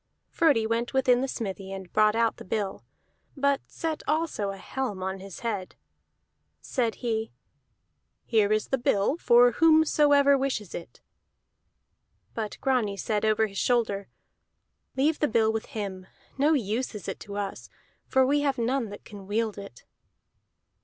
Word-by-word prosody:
Frodi 290 -10 +3
went 230 +3 -1
within 255 -2 +4
the 270 - -1
smithy 195 -6 -5
and 190 -2 -8
brought 215 0 +4
out 230 -1 +1
the - - -9
bill, 195 - -3 0.5
but 280 0 +2
set 320 -2 -4
also 305 -10 0
a 195 - -5
helm 210 -3 -4
on 190 0 -3
his 195 -1 -10
head. 205 -6 -3 0.8
Said 235 -4 -1
he: 220 -1 -1 0.9
"Here 215 -3 +2
is 215 0 +1
the 265 - 0
bill 210 +2 +2
for 245 -5 +5
whomsoever 295 -2 +5
wishes 260 -8 -2
it." 170 - -9 1.3
But 215 -2 -4
Grani 240 -7 +1
said 210 +1 -1
over 220 0 +3
his 200 -2 -5
shoulder, 215 -5 +1 0.9
"Leave 295 +3 +2
the 300 - +2
bill 220 -2 +2
with 220 - -3
him. 190 -3 -6 0.3
No 290 +4 +3
use 235 -2 -1
is 205 - -7
it - - -4
to 205 -1 -7
us, 200 -1 -5 0.4
for 265 0 +3
we 290 +2 +2
have 280 -2 0
none 240 0 0
that 205 - -10
can 200 -2 -11
wield 215 0 -1
it." 200 -12 -11
225 Hz, 155 wpm, -27 LUFS, 205-265 Hz, 1.3 s, for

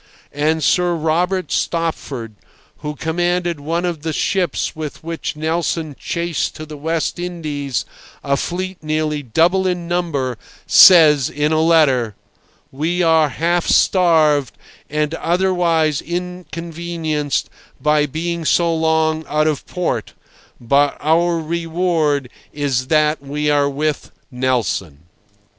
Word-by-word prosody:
And 155 +2 0
Sir 180 -1 +2
Robert 175 +4 0
Stopford, 145 -9 -2 0.4
who 150 0 -5
commanded 175 +1 -1
one 165 +5 -2
of 170 -4 -3
the 160 0 -3
ships 180 +2 -1
with 155 -1 -7
which 165 -1 -4
Nelson 160 -1 -2
chased 170 -2 -2
to 155 - -7
the 155 0 -9
West 160 +3 -2
Indies 150 -7 -3 0.4
a 140 0 +1
fleet 185 +5 -4
nearly 155 -1 -1
double 170 - +2
in 175 -2 -2
number, 145 -9 -2 0.3
says 155 -7 +7
in 150 +1 -1
a 155 0 +2
letter: 135 - +3 0.6
"We 165 +6 -1
are 160 -2 +4
half 170 +5 0
starved 155 -7 +3 0.3
and 150 +1 -1
otherwise 170 -4 +1
inconvenienced 170 -3 -4 0.3
by 150 0 +2
being 170 +3 -3
so 170 +1 +2
long 160 0 +1
out 155 +1 +1
of 155 -3 -1
port, 180 -1 -3 0.5
but 140 +4 +2
our 170 +3 +2
reward 165 -3 -1 0.2
is 135 -4 -1
that 155 0 +2
we 150 +2 -1
are 145 -1 +2
with 150 +1 -2 0.2
Nelson." 120 - -1
160 Hz, 120 wpm, -19 LUFS, 145-170 Hz, 0.6 s, says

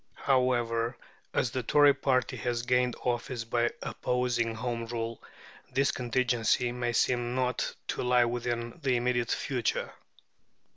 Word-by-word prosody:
However, 120 -3 +1 0.3
as 120 - 0
the 130 - -1
Tory 145 +4 +5
party 130 -2 +1
has 120 -1 -2
gained 125 0 +2
office 120 -1 -2
by 120 +1 +1
opposing 120 -2 -1
Home 115 0 -3
Rule, 115 -1 -4 0.5
this 135 +2 +2
contingency 120 -1 +1
may 120 0 -2
seem 120 +1 +1
not 125 -1 -1
to - - -1
lie 125 -1 +4
within 120 0 -3
the 130 -2 +2
immediate 120 -1 0
future. 125 -5 -1
120 Hz, 130 wpm, -29 LUFS, 120-125 Hz, 0.5 s, Tory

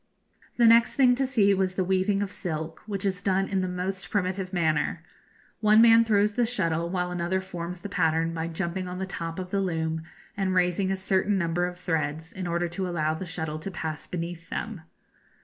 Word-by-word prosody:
The 240 - +5
next 230 +1 +6
thing 255 -3 +5
to 265 +1 0
see 210 -7 +4
was 185 -1 0
the 185 - +1
weaving 190 +2 +1
of 200 - -5
silk, 160 -4 -4
which 200 -1 -3
is 190 -2 -1
done 195 0 +1
in 195 -1 0
the 185 - -1
most 185 +1 -3
primitive 190 -2 -1
manner. 160 -4 0 0.6
One 215 0 +5
man 230 0 +7
throws 210 -2 +2
the 240 +1 +1
shuttle, 170 -7 0
while 180 -1 -1
another 175 +1 -1
forms 180 -1 -6
the - - -5
pattern 165 -3 +1
by 165 0 -2
jumping 170 +2 -3
on 180 0 -5
the 190 - -2
top 165 -3 -5
of 185 -1 -5
the 200 - +1
loom 160 -3 -1 0.3
and 190 -2 0
raising 180 +1 +2
a 195 - +1
certain 190 +1 +1
number 175 0 0
of 180 0 -8
threads, 160 -1 -2
in 185 -1 -4
order 170 +1 0
to 180 +2 -3
allow 155 -3 0
the 175 +4 -6
shuttle 160 -2 -3
to 175 - -5
pass 160 -4 -5
beneath 170 -1 -5
them. 220 -7 -4
185 Hz, 205 wpm, -27 LUFS, 170-195 Hz, 0.6 s, man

